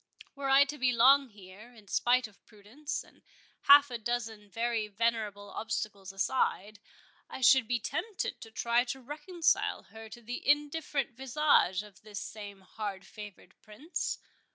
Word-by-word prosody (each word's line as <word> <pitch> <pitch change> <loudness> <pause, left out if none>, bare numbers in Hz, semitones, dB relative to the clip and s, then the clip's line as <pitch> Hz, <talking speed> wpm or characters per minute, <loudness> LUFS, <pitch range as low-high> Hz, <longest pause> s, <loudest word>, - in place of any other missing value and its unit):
Were 275 -1 -4
I 270 +1 +7
to 295 +1 -7
be 250 0 +3
long 265 +3 +5
here, 205 +2 -14
in 215 -3 -17
spite 245 +4 +2
of 210 - -23
prudence, 225 +8 -6
and - - -23 0.4
half 285 -1 +8
a 240 - -4
dozen 225 -3 -4
very 230 0 -1
venerable 210 -1 -2
obstacles 205 -3 -4
beside, 205 0 -1 0.5
I - - -8
should 255 -1 +6
be 245 0 0
tempted 365 - -4
to 225 - -9
try 235 +2 +1
to 260 +2 -5
reconcile 305 +6 -1
her 220 0 -10
to 240 +1 -12
the 245 +3 -5
indifferent 295 -2 +1
visage 265 -7 +2
of 205 -2 -16
this 210 -2 -7
same 205 -2 -8
hard 195 0 -6
favoured 205 -3 -11
Prince. 245 +11 -4
230 Hz, 155 wpm, -31 LUFS, 210-270 Hz, 0.5 s, half